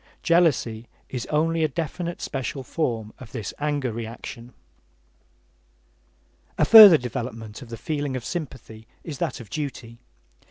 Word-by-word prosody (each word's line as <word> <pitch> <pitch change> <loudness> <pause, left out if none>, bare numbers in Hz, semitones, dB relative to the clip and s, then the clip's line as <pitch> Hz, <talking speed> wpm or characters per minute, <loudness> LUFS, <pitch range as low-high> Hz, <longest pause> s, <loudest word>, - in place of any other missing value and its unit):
Jealousy 145 -10 +2 0.2
is 125 -2 -5
only 160 +2 +1
a - - +3
definite 170 +3 -4
special 135 0 -4
form 115 -7 -3
of 125 - -12
this 110 -5 -5
anger 145 -4 -1
reaction. 115 +1 -8 2.1
A - - +3
further 210 -7 +11
development 115 -2 -6
of 125 - -11
the 115 - -7
feeling 145 +3 -3
of 125 - -5
sympathy 130 -9 -7 0.2
is 150 -5 -7
that - - -2
of 115 -4 -12
duty. 125 -6 -6
130 Hz, 130 wpm, -24 LUFS, 115-155 Hz, 2.1 s, further